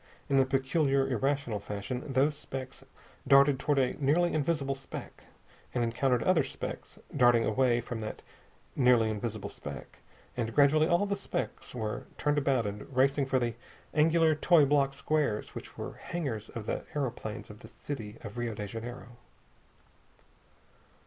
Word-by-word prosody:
In 135 -1 +4
a 135 - +5
peculiar, 135 +1 +2
irrational 135 -3 0
fashion 105 +5 -4
those 140 +3 +2
specks 130 -2 -7 0.4
darted 140 0 +6
toward 145 +1 +1
a 135 +2 0
nearly 170 +6 +3
invisible 145 -2 0
speck, 135 0 -9 0.5
and 120 - +2
encountered 120 +1 +1
other 185 -4 +4
specks - - -6 0.2
darting 120 -4 +5
away 120 +1 +2
from 120 -1 -5
that 110 - -6 0.5
nearly 125 -4 +4
invisible 110 0 -4
speck, - - -9 0.4
and 115 -2 -3
gradually 150 +2 +5
all 175 +3 +3
the 200 0 -1
specks 195 - -5
were 110 -3 -4
turned 145 0 +1
about 135 -5 +1
and 105 +5 -6
racing 135 +1 +3
for 130 - +2
the 120 -2 0 0.4
angular, 160 +1 +4
toy 155 0 +5
block 140 -1 +2
squares 140 -7 -1
which - - -9
were - - -5
the - - -16
hangars 135 -11 -4
of 115 -3 -7
the - - -2
aeroplanes 115 -7 -4
of 105 - -13
the - - -12
city 115 -7 -7
of 105 +3 -7
Rio 120 -2 -2
de 105 - -4
Janeiro. 120 +3 -8
135 Hz, 155 wpm, -30 LUFS, 115-145 Hz, 0.5 s, darted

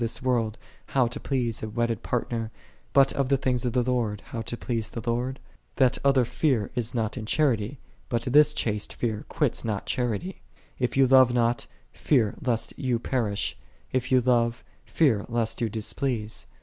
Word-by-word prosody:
this 115 -1 -2
world, 120 -4 +1 0.3
how 130 -2 +2
to 120 - -4
please 120 -4 -1
a 110 - -4
wedded 115 0 -1
partner; 115 -2 -2 0.4
but 135 -1 +5
of 135 -2 0
the 140 - +4
things 130 -1 0
of 120 - -1
the 125 - +2
Lord, 120 -5 0
how 115 - -5
to 120 +1 -5
please 115 -4 -2
j - - -6
the 115 - -10
Lord? 125 +3 -1 0.2
" - - -40
That 130 -1 +3
other 135 -3 +4
fear 120 -5 0
is 120 -1 -1
not 110 +1 -1
in 110 -3 -5
charity, 120 -7 +2
j 140 - -11 0.3
but 115 -1 0
this 150 +4 +5
chaste 105 -2 -2
fear 110 -3 -2
quitteth - - 0
not 105 -3 -2
charity. 125 - -2 0.4
If 125 -1 0
j 135 - +3
you 135 - +6
love 130 -1 +6
not, 120 0 +1 0.3
fear 115 -8 +2
lest 120 -3 0
you 125 -3 +1
perish; 115 -4 -1 0.4
if 130 0 -1
you 130 -1 +5
love, 120 -2 +1 0.2
fear 125 -11 +2
lest 115 -1 -1
you 115 - +1
displease. 110 +1 -2
120 Hz, 190 wpm, -26 LUFS, 115-130 Hz, 0.4 s, you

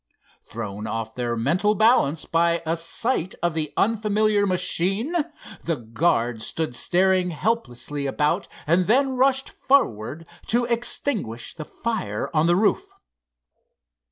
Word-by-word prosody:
Thrown 105 -1 -6
off 115 0 -4
their 120 -1 -2
mental 180 - +2
balance 200 - +3
by 170 0 +1
a 165 +1 0
sight 175 +3 -1
of 175 -1 +1
the 155 -2 -2
unfamiliar 210 -1 +2
machine, 195 - 0 0.5
the 165 - 0
guards 115 -2 0
stood 160 -5 -3
staring 185 +6 +2
helplessly 145 - -2
about 150 +7 0 0.2
and 170 +3 +2
then 265 +4 +3
rushed 270 +1 +2
forward 160 - +1 0.2
to 240 +1 +2
extinguish 230 - -1
the 155 - -7
fire 225 +1 -3
on 155 +1 +3
the 175 - +4
roof. 200 +2 +2
170 Hz, 125 wpm, -24 LUFS, 140-215 Hz, 0.5 s, the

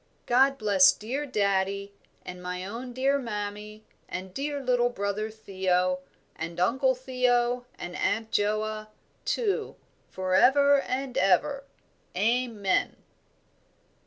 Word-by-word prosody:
"God 270 +3 +4
bless 200 -5 +6
dear 265 +7 -4
daddie, 200 -3 0 0.3
and 180 0 -8
my 180 0 -4
own 235 +5 -6
dear 270 +3 +1
mammie 210 -2 -6 0.2
and 185 0 -6
dear 285 +3 -3
little 245 -2 +2
brother 200 -1 -2
Theo, 185 -4 0 0.4
and 165 +1 -6
Uncle 260 +8 +2
Theo 250 -1 0
and 175 0 -7
Aunt 225 +1 -1
Joa, 215 +1 0 0.4
too, 430 -5 -1 0.3
for 185 0 -3
ever 280 +6 +5
and 260 -2 -2
ever. 195 +9 +2 0.5
Amen." 220 -3 +1
215 Hz, 110 wpm, -27 LUFS, 195-255 Hz, 0.5 s, bless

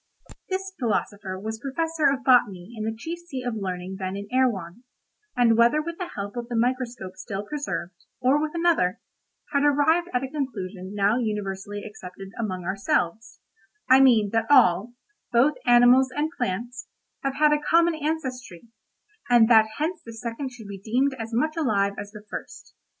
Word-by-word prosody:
This 385 0 -3
philosopher 205 -5 -2
was 220 +2 -5
Professor 310 +3 0
of 270 -1 -3
botany 220 -6 +3
in 215 -1 -4
the 220 0 -2
chief 330 +9 -5
seat 280 -8 -7
of 245 - -1
learning 190 -2 -4
then 190 0 -3
in 200 0 -6
Erewhon, 235 -6 0 0.5
and 235 -2 +5
whether 235 +6 +4
with 335 +3 -5
the 360 - -4
help 200 +1 -5
of 240 0 -5
the 240 - -3
microscope 240 -5 -1
still 200 -3 -5
preserved, 285 -10 -4 0.3
or 260 +3 +3
with 310 0 -2
another, 330 - +2 0.5
had 280 - +3
arrived 295 +4 +3
at 250 +1 0
a - - -2
conclusion 205 -9 -5
now 205 +4 +2
universally 205 -2 -3
accepted 195 -2 -10
among 185 -5 -3
ourselves—I 220 - -1
mean, 225 -6 +5
that 225 +2 0
all, 240 -3 +4 0.4
both 250 +5 +4
animals 245 +2 +6
and 295 +4 -2
plants, 245 +3 -3 0.3
have 275 0 -2
had 300 +1 +4
a 295 - +1
common 335 +3 +3
ancestry, 260 - -4 0.6
and 240 -2 +6
that 220 -2 +7
hence 325 +3 -2
the 230 - -9
second 235 +4 -5
should 245 -4 -12
be 200 -1 -8
deemed 250 +7 +1
as 225 0 -5
much 310 +7 0
alive 205 -10 +1
as 205 - -6
the 210 0 -12
first. - - -9
240 Hz, 165 wpm, -25 LUFS, 205-280 Hz, 0.6 s, that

